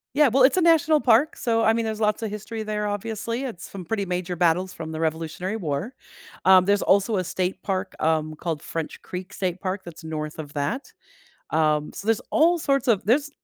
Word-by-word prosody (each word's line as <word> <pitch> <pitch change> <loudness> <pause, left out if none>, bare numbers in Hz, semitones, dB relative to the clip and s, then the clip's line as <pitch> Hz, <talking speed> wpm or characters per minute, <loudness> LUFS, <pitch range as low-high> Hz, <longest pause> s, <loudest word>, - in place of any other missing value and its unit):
Yeah, 295 -2 +5
well, 260 +3 +4
it's 260 - +6
a 370 - +2
national 320 -2 +4
park, 250 +6 +4
so, 230 -2 +1
I 220 - +5
mean, 230 0 0
there's 220 -1 -3
lots 215 +1 +1
of 220 - -2
history 215 +2 -5
there, 210 -1 -2
obviously, 225 +4 -3
it's 235 -10 -6
some 195 -2 -7
pretty 200 +3 -2
major 180 -1 -3
battles 175 +2 +2
from 160 -3 -7
the 160 - -4
Revolutionary 165 +5 -2
War. 165 - -3 0.5
Um, 185 -1 +7
there's 200 +2 +2
also 200 +2 +3
a 185 - 0
state 185 +2 -2
park, 190 -1 -2
um, 155 -1 +1
called 160 -3 -3
French 165 -2 -5
Creek 185 +2 -7
State 185 -2 -2
Park 190 +1 -3
that's 170 -1 -11
north 155 -1 -5
of 150 -2 -7
that. 145 - -3 0.6
Um, 150 -1 +1
so, 200 - -8
there's 225 -1 +2
all 340 +3 +4
sorts 275 -4 +1
of 215 -5 +3
there's 280 +7 +2
195 Hz, 210 wpm, -24 LUFS, 165-225 Hz, 0.6 s, Um